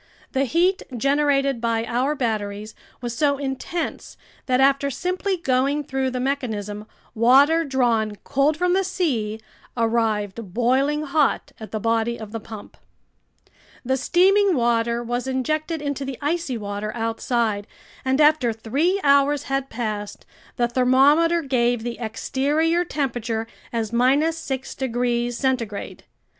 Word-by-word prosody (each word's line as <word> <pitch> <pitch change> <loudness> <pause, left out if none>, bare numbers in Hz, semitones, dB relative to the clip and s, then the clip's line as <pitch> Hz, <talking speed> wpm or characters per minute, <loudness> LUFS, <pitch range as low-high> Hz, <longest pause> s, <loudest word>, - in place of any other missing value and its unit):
The 270 0 +1
heat 350 +8 +2 0.2
generated 275 -1 +1
by 230 -1 0
our 255 +5 0
batteries 215 -4 -3 0.3
was 240 -1 -4
so 285 +1 +2
intense 280 +5 -4 0.3
that 255 -1 +2
after 275 +1 +3
simply 365 +6 -2
going 275 -1 +1
through 265 -1 -1
the 255 0 -3
mechanism, 215 -6 -3 0.3
water 275 +8 +5
drawn 235 -7 +1
cold 280 +3 +1
from 360 +1 +1
the 385 +1 +2
sea 255 - -1 0.4
arrived 225 -3 -1
boiling 270 +5 +2
hot 295 -1 +1
at 220 - -8
the 215 - -3
body 230 +1 0
of 215 -2 -8
the 225 - -4
pump. 215 -1 -11 1.1
The 260 +2 +1
steaming 380 +7 +3
water 235 -1 +1
was 245 +2 -3
injected 310 +4 -2
into 285 -1 -2
the 270 -2 -5
icy 295 -3 -1
water 205 0 -4
outside, 225 -2 -1 0.4
and 265 +1 +1
after 300 -5 +4
three 280 - 0
hours 280 0 +4
had 270 0 -2
passed, 215 -3 -4 0.3
the 240 -2 +1
thermometer 280 +7 +4
gave 245 -4 +1
the 240 0 -5
exterior 290 +9 0
temperature 240 -8 -2 0.3
as 230 -1 -2 0.4
6 270 -5 -5
degrees 240 -1 -1
centigrade. 240 -6 -2
260 Hz, 130 wpm, -23 LUFS, 230-285 Hz, 1.1 s, water